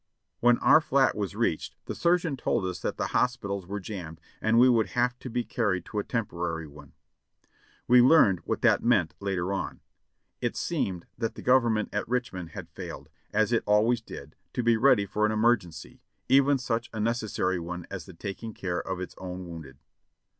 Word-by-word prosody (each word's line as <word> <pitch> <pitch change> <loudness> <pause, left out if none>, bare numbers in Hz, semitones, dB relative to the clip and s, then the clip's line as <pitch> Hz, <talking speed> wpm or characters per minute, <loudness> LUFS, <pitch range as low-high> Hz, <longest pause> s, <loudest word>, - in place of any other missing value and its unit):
When 120 0 +5
our 145 +5 +6
fiat 135 -3 +3
was 100 -1 -3
reached 105 -8 -1
the - - -4
surgeon 170 -3 +1
told 120 -5 -1
us 90 -1 -3
that - - -3
the - - -2
hos - - +1
pitals 100 -2 -5
were 100 +2 -4
jammed, 90 -5 -7 0.2
and 110 +1 +2
we 125 +2 +7
would 115 -5 +3
have 125 0 +1
to 130 - -7
be 120 +1 -1
carried 105 -7 -1
to 105 - -3
a - - -1
tem 115 -3 -1
porary 85 -3 -4
one. 75 +1 -14 0.9
We 125 0 +7
learned 120 - +6
what - - -4
that - - +4
meant 105 -9 +2
later 95 -1 -2
on. 95 - -4 0.6
It - - -1
seemed 90 -3 -2
that 115 -2 -2
the - - -9
Government 120 -4 +3
at 105 +2 -2
Richmond 120 -9 -2
had - - -9
failed, - - -8 0.2
as 110 +1 +2
it 115 - +3
always 110 +3 +3
did, 75 -9 -10 0.2
to 125 - -1
be 115 0 +4
ready 115 -3 +4
for 105 +2 -2
an 105 - +3
emergency, 110 -8 0 0.3
even 140 +1 +5
such 120 -2 -2
a 110 - -6
necessary 105 -5 0
one 90 0 -6
as 100 -1 -6
the 95 - -11
taking 100 +5 -6
care 90 -2 -2
of 95 -1 -4
its 95 - -6
own 90 0 -6
wounded. 80 -6 -9
105 Hz, 195 wpm, -27 LUFS, 90-120 Hz, 0.9 s, we